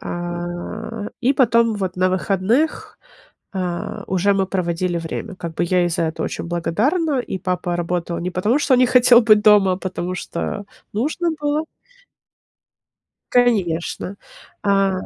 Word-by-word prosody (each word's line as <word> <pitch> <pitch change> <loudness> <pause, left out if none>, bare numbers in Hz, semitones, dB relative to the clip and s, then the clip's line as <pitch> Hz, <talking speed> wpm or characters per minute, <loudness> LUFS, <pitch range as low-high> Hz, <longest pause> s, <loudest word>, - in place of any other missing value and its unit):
А, 175 +5 -5
и 265 +3 +3
потом 235 -4 +3
вот 190 -3 -3
на 185 0 +2
выходных, 200 - 0 0.5
а, 180 -2 -4
уже 190 +2 +2
мы 195 -1 +1
проводили 180 -1 -1
время. 165 +3 -5
Как 170 -2 -6
бы - - 0
я 180 +1 +2
ей 175 - +2
за 165 - -1
это 160 0 -3
очень - - -4
благодарна, 250 - 0
и 190 - -5
папа 180 -1 -2
работал 170 0 -2
не 180 +1 -3
потому, 210 +10 +1
что 280 -2 +3
не 250 0 +5
хотел 245 -1 +6
быть 215 -2 +5
дома, 210 -3 +6
а 180 - -1
потому 185 -1 -4
что 205 +2 -4 0.3
нужно 310 +10 -1
было. 295 +2 0 1.7
Конечно. 195 -6 +1 0.5
А, 195 -1 +3
190 Hz, 145 wpm, -20 LUFS, 175-230 Hz, 1.7 s, хотел